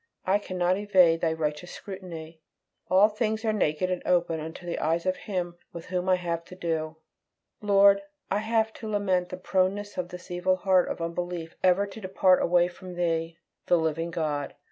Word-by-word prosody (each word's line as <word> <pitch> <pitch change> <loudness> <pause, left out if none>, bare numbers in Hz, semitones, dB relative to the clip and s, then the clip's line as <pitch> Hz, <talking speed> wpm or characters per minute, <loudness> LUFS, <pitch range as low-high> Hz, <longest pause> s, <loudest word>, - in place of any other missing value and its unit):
I 195 +2 +3
cannot 185 -1 0
evade 180 -5 +4
Thy 165 - +2
righteous 160 +2 -3
scrutiny; 170 -5 -9 0.5
all 190 +3 +6
things 220 +1 -2
are 220 - +2
naked 185 -2 0
and 180 - -2
open 175 -2 +1
unto 160 +3 -8
the 170 - -3
eyes 165 +2 0
of 185 0 +1
Him 180 -4 -4 0.2
with 170 -1 -8
whom 180 0 -2
I 185 - +6
have 170 -2 -3
to 180 - -11
do! 160 -3 -3 0.6
Lord, 200 -1 +5 0.3
I 200 - +2
have 220 0 0
to 220 - -7
lament 190 -4 0
the 185 - -6
proneness 190 +2 -1
of 175 -1 -3
this 180 0 -10
evil 180 +1 +1
heart 185 -1 +2
of - - -4
unbelief 170 0 -4
ever 185 +2 +4
to 200 +2 -10
depart 185 -1 +3
away 175 0 +3
from 180 0 -10
Thee, 165 -1 -1 0.3
the 175 - +5
living 165 +1 -1
God. 150 -4 -2
180 Hz, 185 wpm, -27 LUFS, 165-190 Hz, 0.6 s, all